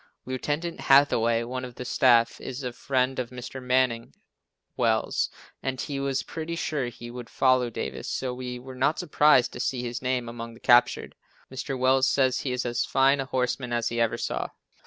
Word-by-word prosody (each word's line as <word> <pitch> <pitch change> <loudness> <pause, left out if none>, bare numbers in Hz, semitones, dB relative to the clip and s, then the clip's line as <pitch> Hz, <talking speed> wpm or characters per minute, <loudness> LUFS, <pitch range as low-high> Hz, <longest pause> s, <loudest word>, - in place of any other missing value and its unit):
Lieutenant 145 +6 -3
Hathaway, 120 -5 +4
one 125 +2 -5
of 125 -2 -8
the 125 - -7
staff, 120 -2 +3
is 130 +2 -6
a 125 -1 -4
friend 130 +1 0
of 125 -2 -3
Mr. 125 +1 -8
Manning 125 - 0 0.6
Wells, - - +1 0.3
and 130 -1 -3
he 140 +1 -3
was 135 -1 -1
pretty 165 +1 -5
sure 150 -5 -2
he 120 0 -9
would 120 -1 -8
follow 130 -2 +3
Davis, 115 - -5
so 130 -1 -2
we 125 0 -5
were 130 +1 -10
not 135 +5 +1
surprised 145 -4 +4
to - - -7
see 125 0 -1
his 120 0 -4
name 125 -2 -1
among 115 0 -7
the - - -16
captured. 120 0 +3 0.4
Mr. 130 +1 -4
Wells 130 +1 +3
says 130 -2 +2
he 130 - -3
is 125 0 -2
as 120 0 0
fine 135 +1 +3
a 135 - -1
horseman 125 -1 -2
as 120 0 0
he 115 0 -1
ever 115 - +1
saw. - - -2
125 Hz, 190 wpm, -26 LUFS, 120-135 Hz, 0.6 s, Hathaway